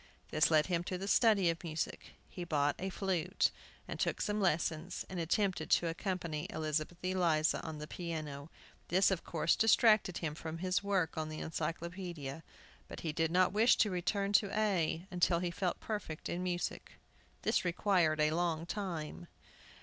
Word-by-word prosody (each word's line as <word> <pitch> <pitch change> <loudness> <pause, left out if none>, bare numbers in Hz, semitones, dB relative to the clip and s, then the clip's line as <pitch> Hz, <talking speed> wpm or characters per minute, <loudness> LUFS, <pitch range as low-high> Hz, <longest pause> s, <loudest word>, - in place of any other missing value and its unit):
This 155 - +4
led 155 -2 +4
him 175 -2 0
to 185 - -3
the 195 +2 -5
study 200 -5 +4
of 165 - -8
music. 160 -1 -4
He 180 - -7
bought 145 -4 +1
a 190 - -2
flute, 185 -1 0 0.4
and - - -6
took - - 0
some 210 0 -1
lessons, 165 -1 0
and 185 - -3
attempted 175 0 0
to 170 - +3
accompany 170 -3 -3
Elizabeth 155 +2 -2
Eliza 170 -4 +2
on 160 -1 -6
the 150 - -6
piano. 155 -4 -5 0.4
This, 190 +3 +4
of 185 - -1
course, 165 0 +1
distracted 220 -4 +4
him 155 -3 -3
from 160 +1 -6
his 185 +2 0
work 190 -6 0
on 155 0 -3
the 155 - -6
Encyclopædia. 165 -3 -4 0.5
But - - -8
he 160 - -2
did 160 +1 +1
not 180 +2 +3
wish 225 +4 +5
to 210 - +3
return 195 +3 -1
to 205 0 +4
A 180 -5 +1
until 175 -1 +2
he 175 0 -1
felt 180 +1 -2
perfect 205 -8 -5
in 175 - -2
music. 180 -1 -3 0.5
This - - +2
required 175 -3 +2
a 150 0 +3
long 165 -1 0
time. 165 - -4
175 Hz, 170 wpm, -34 LUFS, 160-190 Hz, 0.5 s, wish